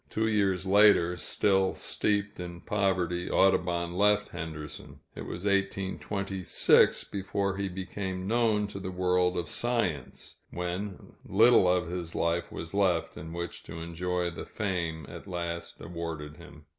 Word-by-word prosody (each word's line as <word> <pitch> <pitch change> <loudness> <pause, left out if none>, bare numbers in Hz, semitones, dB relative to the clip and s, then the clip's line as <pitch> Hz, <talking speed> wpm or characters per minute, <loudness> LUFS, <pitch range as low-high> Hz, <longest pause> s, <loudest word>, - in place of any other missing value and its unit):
Two 110 0 0
years 100 -4 +1
later, 95 -3 +5
still 95 +3 +2
steeped 100 -1 -1
in 85 -1 -7
poverty, 90 -4 0
Audubon 85 -2 +2
left 105 +2 +3
Henderson. 80 -3 -8
It - - -7
was 90 +3 -6
1826 95 -1 +2
before 100 0 -2
he 100 -1 -2
became 95 0 -4
known 110 -2 +2
to 100 - -7
the 95 -1 -5
world 90 0 +1
of 85 - -2
science, 105 - -2
when 90 +3 -5
little 110 0 +5
of 90 -1 +2
his 85 -1 -5
life 85 +1 0
was 80 +2 -6
left 95 -5 +1
in 80 +2 -8
which 85 0 -5
to 80 - -7
enjoy 90 +1 -2
the 85 - -8
fame 85 -6 -3
at - - -10
last 85 -2 -4
awarded 80 -3 -6
him. 75 +2 -14
90 Hz, 140 wpm, -29 LUFS, 85-100 Hz, -, later